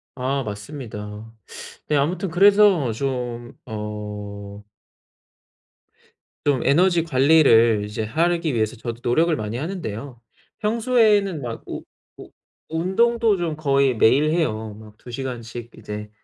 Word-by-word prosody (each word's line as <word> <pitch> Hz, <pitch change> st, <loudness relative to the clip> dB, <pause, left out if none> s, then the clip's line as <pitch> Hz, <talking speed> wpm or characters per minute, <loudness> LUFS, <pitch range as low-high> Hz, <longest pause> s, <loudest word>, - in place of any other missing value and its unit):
아 135 Hz, +1 st, -1 dB
맞습니다. 105 Hz, -1 st, -8 dB, 0.5 s
네 150 Hz, -, +1 dB
아무튼 175 Hz, +7 st, 0 dB
그래서 195 Hz, -, +5 dB
좀 120 Hz, -1 st, -4 dB
어 105 Hz, -2 st, -7 dB, 1.8 s
좀 140 Hz, -4 st, +2 dB
에너지 170 Hz, +3 st, +4 dB
관리를 130 Hz, -7 st, +4 dB
이제 105 Hz, +1 st, -4 dB
하기 165 Hz, +4 st, 0 dB
위해서 110 Hz, +1 st, 0 dB
저도 115 Hz, +1 st, -6 dB
노력을 160 Hz, +8 st, +2 dB
많이 110 Hz, -1 st, -4 dB
하는데요. 135 Hz, -, -5 dB, 0.4 s
평소에는 215 Hz, -, +2 dB
막 120 Hz, -2 st, -5 dB
우 -, -, -6 dB, 0.3 s
우 -, -, -12 dB, 0.4 s
운동도 220 Hz, +5 st, +2 dB
좀 170 Hz, -3 st, -2 dB
거의 140 Hz, -4 st, +2 dB
매일 140 Hz, +8 st, +4 dB
해요. 110 Hz, -10 st, -1 dB
막 105 Hz, -1 st, -14 dB
2 120 Hz, -, -12 dB
시간씩 120 Hz, -2 st, -6 dB
이제 105 Hz, 0 st, -7 dB
130 Hz, 230 characters per minute, -22 LUFS, 110-165 Hz, 1.8 s, 그래서